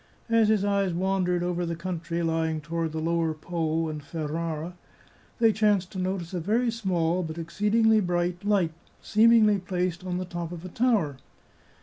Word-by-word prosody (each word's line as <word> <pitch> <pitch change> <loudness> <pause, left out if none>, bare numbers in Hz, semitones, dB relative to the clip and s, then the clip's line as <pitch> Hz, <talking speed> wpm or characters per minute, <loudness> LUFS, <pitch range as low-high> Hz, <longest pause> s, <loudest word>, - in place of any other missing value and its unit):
As 225 -1 +5
his 210 -2 +2
eyes 200 -3 +1
wandered 180 -1 0
over 175 0 -1
the 170 -1 -2
country 170 -1 -3
lying 160 -1 0
to 155 - -17
ward 165 -1 -1
the 160 - -5
lower 165 0 0
Po 165 0 -2
and 155 -1 -5
Ferrara, 160 +2 -4 0.6
they 225 -2 +4
chanced 205 -4 +2
to 190 - -5
notice 185 -1 -3
a 180 - -1
very 230 +8 +1
small, 185 -6 0
but 160 -2 -5
exceedingly 210 +6 +2
bright, 175 -1 -1
light, 195 -6 +2 0.3
seemingly 215 -2 +4
placed 180 -1 -2
on 180 -1 -3
the 185 - -3
top 175 -1 -5
of 175 0 -8
a - - -6
tower. 205 - +1
180 Hz, 170 wpm, -27 LUFS, 165-200 Hz, 0.6 s, As